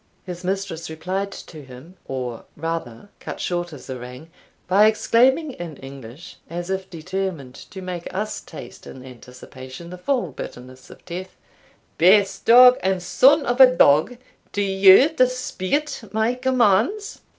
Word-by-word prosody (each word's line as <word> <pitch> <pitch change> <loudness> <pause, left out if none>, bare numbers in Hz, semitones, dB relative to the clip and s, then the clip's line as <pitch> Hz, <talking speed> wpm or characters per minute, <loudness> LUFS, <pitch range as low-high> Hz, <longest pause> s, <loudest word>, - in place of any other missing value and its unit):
His 180 -1 -8
mistress 185 -3 -4
replied 185 +5 -4
to 155 -5 -11
him, 135 +7 -14
or 125 -3 -5
rather 165 - -5
cut - - -8
short 175 -1 -3
his 150 -5 -12
harangue, 125 +4 -9 0.4
by 200 +4 +5
exclaiming 260 +7 +2
in 170 - -9
English 135 +2 -11
(as 175 +2 -5
if 190 0 -4
determined 170 -5 -5 0.2
to 190 -1 -9
make 180 -2 -6
us 210 +3 -4
taste - - -12
in 130 0 -11
anticipation 130 +5 -12
the 180 - -9
full 260 +6 -1
bitterness 130 +1 -10
of - - -16
death) 185 +2 -8 0.6
"Base 195 +3 +4
dog, 250 +2 +7
and 190 -1 -1
son 280 - +4
of 245 +2 +1
a 260 - +11
dog, 155 - +4 0.3
do 205 - -1
you 195 +5 +6
dispute 255 - -1
my 220 +2 0
commands? 255 - 0
185 Hz, 140 wpm, -22 LUFS, 155-220 Hz, 0.6 s, a